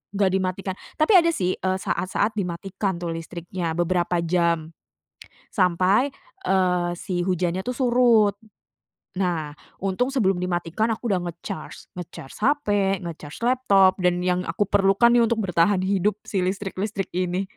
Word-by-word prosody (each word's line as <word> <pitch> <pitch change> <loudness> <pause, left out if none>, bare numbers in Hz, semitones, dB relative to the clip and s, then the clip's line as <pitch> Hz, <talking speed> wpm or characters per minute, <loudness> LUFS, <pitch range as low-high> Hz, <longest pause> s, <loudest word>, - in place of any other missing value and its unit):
nggak 195 -1 +3
dimatikan. 190 0 -2 0.2
Tapi 315 +7 +4
ada 335 -1 +4
sih, 185 - -1
eee 185 0 -1
saat-saat 205 +4 -1
dimatikan 190 0 -3
tuh 175 - -3
listriknya, 170 0 -5
beberapa 175 0 +1
jam, 170 -2 +1 0.8
sampai, 185 +7 +2 0.3
eee, 180 -2 +2
si 175 0 -3
hujannya 180 0 0
tuh 250 - -3
surut. 240 -5 +4 0.8
Nah, 165 -5 -1 0.3
untung 245 +8 0
sebelum 195 -8 +2
dimatikan 180 +5 -1
aku 230 +2 -5
udah 185 - +2
nge-charge, 175 +3 -8
nge-charge 165 -6 -8
HP, 285 +3 +1 0.4
nge-charge 160 -2 -8
laptop, 205 -7 +4
dan 180 0 +1
yang 180 0 0
aku - - 0
perlukan 200 +3 +4
nih 240 -1 +5
untuk 225 0 0
bertahan 185 +1 +2
hidup, 195 +1 +1
si 195 - -2
listrik-listrik 195 +1 -3
ini. 180 +1 -1
185 Hz, 135 wpm, -24 LUFS, 175-205 Hz, 0.8 s, nih